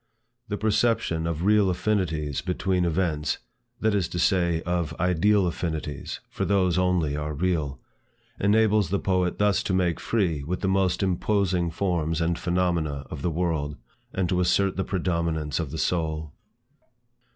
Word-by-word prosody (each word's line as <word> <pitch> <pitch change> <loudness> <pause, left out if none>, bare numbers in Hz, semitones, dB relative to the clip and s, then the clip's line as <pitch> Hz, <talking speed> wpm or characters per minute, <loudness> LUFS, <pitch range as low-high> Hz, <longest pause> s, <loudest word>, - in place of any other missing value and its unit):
The 105 - -3
perception 105 -6 +1
of 85 0 -2
real 105 -1 +4
affinities 85 -7 -1
between 90 0 0
events, 80 -3 0 0.4
(that 110 -1 +2
is 95 -5 +1
to - - -6
say, 85 -2 +2
of 85 -3 -1
ideal 90 +3 +3
affinities, 80 -4 -4
for - - -4
those 95 -2 +2
only 90 -5 +1
are 75 0 -3
real,) 75 -5 -1 0.6
enables 105 -2 +3
the 100 - +1
poet 90 -2 0
thus 105 -1 +2
to 95 - -2
make 90 -3 +1
free 85 -10 0
with 90 +5 -3
the 95 - 0
most 95 0 +1
imposing 95 -1 +1
forms 85 -2 -1
and 85 0 0
phenomena 85 -6 0
of - - -6
the 90 - 0
world, 80 -3 -1 0.3
and 95 -2 -1
to 90 - +1
assert 95 +2 +2
the 95 - -1
predominance 85 -5 -1
of 80 -4 -2
the 80 - -5
soul. 80 -3 -1
90 Hz, 150 wpm, -26 LUFS, 80-95 Hz, 0.6 s, real